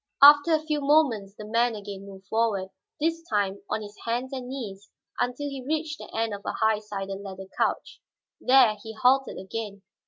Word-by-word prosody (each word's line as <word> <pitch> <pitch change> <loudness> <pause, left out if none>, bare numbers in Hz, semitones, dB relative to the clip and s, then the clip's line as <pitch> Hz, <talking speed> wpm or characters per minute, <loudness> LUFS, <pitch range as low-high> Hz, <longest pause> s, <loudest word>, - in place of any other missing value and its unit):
After 290 +3 +9
a 310 - -2
few 300 -2 0
moments 270 -9 +2
the 210 - -8
man 230 +2 +2
again 200 -1 -8
moved 195 -1 -12
forward, 210 -3 0 0.3
this 330 +2 0
time 200 -2 0
on 215 - -1
his 205 0 -10
hands 245 +4 -2
and 255 -2 -5
knees, 205 -7 -7 0.3
until 250 +4 -1
he 275 -2 -6
reached 305 +2 -2
the - - -9
end 225 -1 -1
of 200 - -6
a - - -3
high 220 -1 +2
sided 195 -2 -5
leather 190 -1 -8
couch. - - -1 0.4
There 250 -5 +5
he 220 +1 -8
halted 260 +4 +3
again. 200 0 -6
225 Hz, 185 wpm, -26 LUFS, 200-270 Hz, 0.4 s, After